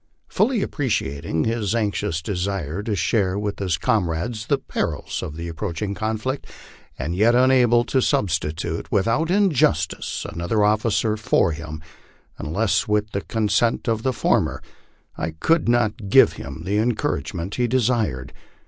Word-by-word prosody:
Fully 225 -1 +1
appreciating 80 - -1
his 110 -1 -1
anxious 100 -7 -1
desire 95 -2 -2
to 105 0 -2
share 95 +1 +1
with 105 0 -3
his 90 -5 0
comrades 105 +5 -1
the 140 - +2
perils - - -3
of 75 - -6
the 85 +1 -5
approaching 90 +4 -3
conflict, 110 +6 -3 0.5
and 80 +6 -3
yet 115 +5 +4
unable 125 -2 +5
to 130 +1 +1
substitute, 80 -5 -1
without 115 - +1
injustice, 190 -6 +1
another 85 +6 -1
officer 110 +1 +2
for 105 -5 +2
him 80 -1 -7 0.6
unless 100 +10 0
with 105 0 0
the 100 - -2
consent 110 +1 0
of 115 -1 +1
the 130 - +1
former, 125 - 0 0.5
I 80 0 -3
could 165 -6 +2
not 115 -3 +1
give - - +6
him - - -8
the 105 +2 +1
encouragement 110 - -1
he 120 -1 +1
desired. 115 - 0
105 Hz, 140 wpm, -22 LUFS, 85-120 Hz, 0.6 s, give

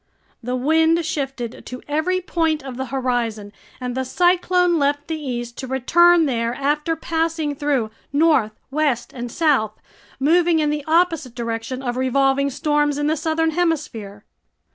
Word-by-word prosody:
The 250 +1 -3
wind 320 +5 +2
shifted 270 -6 -4
to 250 - -8
every 320 +5 0
point 325 -4 0
of 265 -2 -7
the 260 +1 -4
horizon, 240 -5 -2 0.3
and 250 -1 -4
the 260 +1 -1
cyclone 355 +3 +2
left 285 +1 0
the 325 - -2
east 240 -4 -5
to 260 - -5
return 335 +6 +4
there 235 -3 -1
after 300 +4 0
passing 325 -2 -1
through 275 -6 -1 0.2
north, 285 -7 +3 0.2
west, 280 -5 0
and 240 -2 -6
south, 260 -10 +1 0.4
moving 335 +4 +3
in 300 -1 +1
the 300 -1 -2
opposite 325 -6 +1
direction 230 +2 -4
of 245 -1 -2
revolving 270 +2 +2
storms 295 +1 0
in 295 - -1
the 310 +1 +2
southern 320 +1 0
hemisphere. 300 - -2
285 Hz, 150 wpm, -21 LUFS, 250-320 Hz, 0.4 s, return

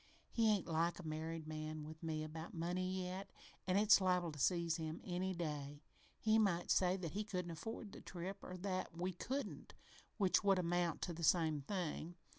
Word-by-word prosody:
He 225 -2 +4
ain't 205 -3 +2
like 165 +1 +1
a 180 - -8
married 160 +1 -3
man 155 0 -4
with 155 +1 -9
me 160 -2 -2
about 160 +2 -6
money 185 +2 -1
yet, 190 +2 -5 0.4
an' 185 +1 +3
it's 205 0 +7
liable 180 -2 +2
to 150 - -9
seize 170 +1 +2
him 160 -1 -3
any 185 +1 -1
day. 145 -3 -4 0.3
He 220 0 +4
might 180 -5 +2
say 185 0 +4
that 170 -4 -4
he 210 +6 -1
couldn't 180 -4 -3
afford 205 +5 -5
the - - -10
trip, 190 +3 -6
or 180 - -6
that 185 -2 -3
we 180 +2 -1
couldn't, 265 +10 -4 0.4
which 195 -1 +4
would 195 -1 +5
amount 175 -2 +1
to 175 - -2
the 170 +1 -6
same 160 -2 +4
thing. 175 0 -3
175 Hz, 190 wpm, -39 LUFS, 160-190 Hz, 0.4 s, it's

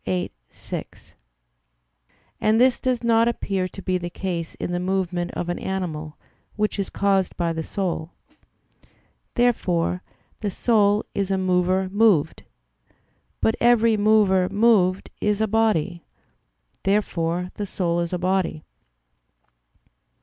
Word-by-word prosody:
viii, 90 -2 -2 0.2
6; - - -8 1.3
and 215 +1 +3
this 255 0 +4
does 250 -2 -1
not 230 0 +4
appear 195 -5 -1
to 195 +1 -11
be 185 -1 0
the 175 0 -5
case 175 -2 -4
in - - -4
the 175 - -1
movement 180 -1 -1
of 175 - -3
an 175 - -2
animal, 160 -5 -4 0.4
which 210 -1 -1
is 195 - -2
caused 195 -2 +1
by 170 -1 0
the 160 - -3
soul. 170 -3 -3 1.3
Therefore 180 -8 +1 0.4
the 210 - -2
soul 210 0 +2
is 195 -1 -1
a 195 - +1
mover 185 0 +1
moved. 195 -6 +2 1.0
But 225 - +3
every 230 -2 +4
mover 205 -3 +3
moved 200 -3 +2
is 210 0 +1
a 220 - +2
body. 195 -6 +1 0.8
Therefore 180 -3 0
the 205 - -4
soul 175 -2 -1
is 170 -1 -2
a 180 - -1
body. 185 -3 -1
190 Hz, 130 wpm, -23 LUFS, 175-210 Hz, 1.3 s, this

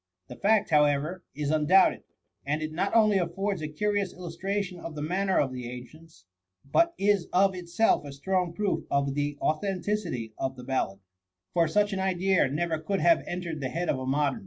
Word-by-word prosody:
The - - -8
fact, 210 -2 +2
however, 150 +4 +2
is 145 -1 -2
undoubted; 155 +5 +4 0.4
and 150 +3 -1
it 155 - -4
not 180 +5 -1
opiy 215 -4 +4
affords 195 +2 -2
a 155 - -3
curious 205 +5 -1
illustration 180 +2 -4
of 165 -2 -7
the 150 - -5
manner 190 +4 0
of 135 -2 0
the 125 -1 -6
ancients, 125 - -12 0.4
but 335 - +2
is 200 -3 +2
of 190 +1 +4
itself 180 +3 +1
a 145 - -8
strong 180 +5 -1
proof 190 -3 -1
of 140 -1 +1
the 145 0 -2
authenticity 180 - -1
of 130 0 -2
the 125 - -10
ballad; 125 -7 -2 0.5
for 170 -1 +3
such 205 +5 +1
an 190 - -2
idea 190 -3 +2
never 160 +3 -1
could 195 +5 -2
have 335 - +4
entered 175 -3 -4
the 130 - -2
head 170 +5 -2
of 130 - +1
a 130 - -5
modem. 140 0 +1
170 Hz, 185 wpm, -28 LUFS, 145-195 Hz, 0.5 s, undoubted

